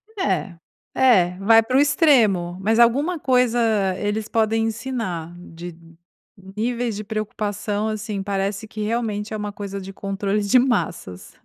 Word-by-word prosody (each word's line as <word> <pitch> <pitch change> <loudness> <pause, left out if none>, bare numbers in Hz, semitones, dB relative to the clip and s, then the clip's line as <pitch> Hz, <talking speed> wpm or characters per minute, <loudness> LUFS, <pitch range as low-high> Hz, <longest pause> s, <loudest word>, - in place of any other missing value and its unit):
É, 370 - -1 0.4
é, 185 -9 +4
vai 225 +3 +6
pro 255 +4 +1
extremo, 225 - +3
mas 220 +3 +1
alguma 285 +9 +3
coisa 250 -3 +2 0.4
eles 210 +1 -2
podem 225 0 +1
ensinar 225 -8 -4
de 175 -1 -10 0.8
níveis 235 0 -1
de 210 - -5
preocupação, 210 0 -3
assim, 215 -2 -4
parece 200 +1 -2
que 215 0 -7
realmente 215 -1 -2
é - - -2
uma 210 0 -4
coisa 200 -1 -6
de 190 +1 -8
controle 195 +1 -2
de 205 +5 +4
massas. 170 - -2
215 Hz, 135 wpm, -22 LUFS, 195-235 Hz, 0.8 s, vai